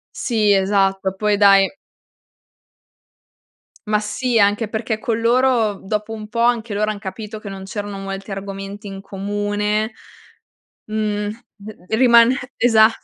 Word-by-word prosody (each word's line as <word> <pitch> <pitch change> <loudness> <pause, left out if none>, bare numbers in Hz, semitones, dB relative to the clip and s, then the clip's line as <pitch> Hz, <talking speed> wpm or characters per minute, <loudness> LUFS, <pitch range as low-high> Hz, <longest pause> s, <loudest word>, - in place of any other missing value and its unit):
Sì 215 -4 +1
esatto, 195 -1 +1
poi 210 0 +1
dai 195 -1 +5 2.2
Ma 210 0 +2
sì, 230 +3 -1
anche 205 +1 +2
perché 220 0 -3
con 225 0 -1
loro, 235 -2 +3
dopo 210 +2 -3
un 215 -1 -7
po' 230 - -6
anche 235 -2 +1
loro 215 +1 0
han 205 - -9
capito 215 +2 -7
che 210 - -8
non 195 -1 -7
c'erano 205 0 -5
molti 195 +1 -6
argomenti 195 +1 -6
in 195 -1 -7
comune, 205 +2 -2 0.9
mhmm, 210 -1 -2 0.6
ri 220 - 0
rimane 235 0 +6 0.2
esa 220 -2 +5
210 Hz, 130 wpm, -20 LUFS, 200-220 Hz, 2.2 s, rimane